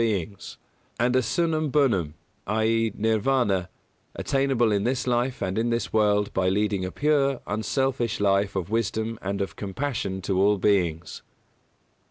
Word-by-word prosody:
e._, 100 -3 -2 0.4
Nirvāna, 115 - 0 0.5
attainable 135 -4 +1
in 100 -1 +1
this 125 +2 -1
life 125 -1 0
and 95 +3 -1
in 115 +1 0
this 115 0 -2
world 105 -1 +2
by 95 -1 +1
leading 100 0 0
a 95 - -3
pure, 140 -3 +1
unselfish 120 +1 -1
life 100 0 +1
of 95 0 -3
wisdom 110 0 -1
and 100 +1 -3
of 95 -4 -4
compassion 100 -2 -3
to 95 0 0
all 105 +1 +4
beings. 90 -5 0
110 Hz, 120 wpm, -25 LUFS, 100-125 Hz, 0.5 s, all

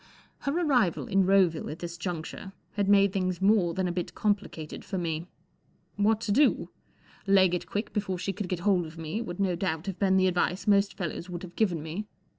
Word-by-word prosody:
Her 280 - -2
arrival 245 - +2
in 195 -2 +2
Roville 185 -5 +3
at 155 - -6
this 170 0 -6
juncture 175 +2 -5 0.2
had 200 -1 -1
made 200 -1 +5
things 185 -2 -1
more 190 -4 +3
than 185 -1 0
a - - -1
bit 175 0 -4
complicated 200 -7 -2
forme. 170 -3 -3 0.7
What 210 +2 +2
to 220 - -2
do? 275 +7 +3 0.6
Leg 190 -2 +5
it 180 - -2
quick 205 +2 -3
be¬ 210 - +1
fore 190 -2 -3
she 195 +2 -3
could 205 -3 -5
get 180 -2 -2
hold 180 -3 +2
of 160 +1 -12
me* 165 +7 -3
would 175 -6 -6
no 190 -3 +1
doubt 165 -2 -2
have 195 -2 -5
been 190 -2 +3
the 185 - +4
advice 180 +1 0
most 200 -1 +3
fei^ 175 -6 -2
lows 175 - -7
would 175 0 -6
have 180 -1 -10
given 175 -8 +1
me. 175 +7 -5
185 Hz, 215 wpm, -28 LUFS, 175-200 Hz, 0.7 s, made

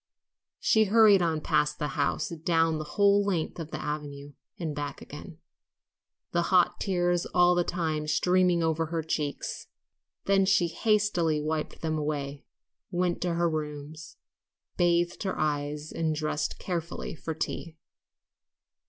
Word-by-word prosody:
She 220 -1 +4
hurried 210 -2 +6
on 160 -2 0
past 150 -2 +1
the 150 -1 -2
house, 145 +8 -1
down 165 -1 +1
the 155 - -7
whole 200 0 +5
length 180 -4 -2
of 160 -2 -5
the - - -5
avenue 145 -1 -5 0.2
and 160 -4 -3
back 145 -1 -5
again, 155 +3 -10 0.9
the 175 - +2
hot 180 -2 +3
tears 175 -2 0
all 180 0 +6
the 175 0 +2
time 160 -4 -2
streaming 180 +2 +3
over 160 0 0
her 165 0 -2
cheeks. 150 -2 -3 0.6
Then 195 -1 +3
she 190 -3 +3
hastily 190 -6 +1
wiped 155 0 -3
them 155 -1 -1
away, 145 -2 -3 0.4
went 180 -1 -1
to 175 -2 0
her 170 0 +2
rooms, 155 0 -5 0.6
bathed 175 0 +1
her 190 -2 -2
eyes, 150 0 -2
and 160 -1 -1
dressed 155 0 -2
carefully 170 -2 -4
for 160 0 -5
tea. 160 +1 -4
165 Hz, 140 wpm, -28 LUFS, 150-175 Hz, 0.9 s, hurried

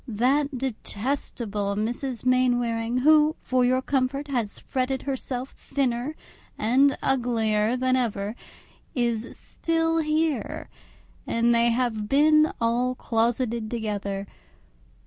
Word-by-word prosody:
That 260 +5 +1
detestable 220 -4 -3
Mrs. 240 +4 -2
Mainwaring, 245 -2 +1
who, 310 0 +5
for 255 -1 +1
your 255 +1 +2
comfort, 275 +1 -1
has 235 -6 -2
fretted 260 0 -2
herself 265 -1 -3
thinner 265 +1 -1 0.4
and 260 +6 +3
uglier 230 -3 +1
than 255 0 +2
ever, 215 -4 -1 0.6
is 235 -2 -1
still 325 0 -1
here, 310 -1 -1 0.6
and 235 +1 +2
they 235 0 +3
have 230 -3 -1
been 305 +2 +5
all 240 +2 +1
closeted 230 -1 -1
together. 205 -4 -3
245 Hz, 105 wpm, -25 LUFS, 230-270 Hz, 0.6 s, who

